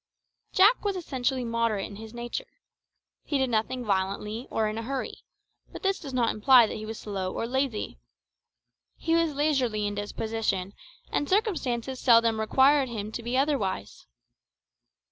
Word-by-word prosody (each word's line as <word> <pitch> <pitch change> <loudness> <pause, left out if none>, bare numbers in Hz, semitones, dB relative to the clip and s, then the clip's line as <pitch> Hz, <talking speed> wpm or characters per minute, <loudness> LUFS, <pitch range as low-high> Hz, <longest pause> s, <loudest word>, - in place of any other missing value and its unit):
Jack 410 +6 +5
was 405 -2 0
essentially 265 -7 -2
moderate 230 -3 0
in 200 - -9
his 220 0 -9
nature. 240 - -6 0.6
He 290 - -1
did 265 -2 0
nothing 235 +3 -1
violently 205 +4 -2
or 220 -1 0
in 215 +1 -3
a - - -3
hurry; 260 +2 -4 0.5
but - - -9
this 390 0 +1
does 280 - -7
not 245 -3 +2
imply 245 +2 +6
that - - -5
he 215 0 -7
was 220 0 -5
slow 190 -3 -3
or - - -3
lazy. 250 - -2 1.0
He 325 - -1
was 330 -3 +2
leisurely 260 -8 +1
in 205 - -1
disposition, 205 -2 -2 0.4
and 290 - -1
circumstances 265 - 0
seldom 230 -2 +4
required 265 +4 +4
him 215 -2 -5
to 235 - -5
be 240 +2 -2
otherwise. 210 - -1
235 Hz, 155 wpm, -27 LUFS, 215-275 Hz, 1.0 s, imply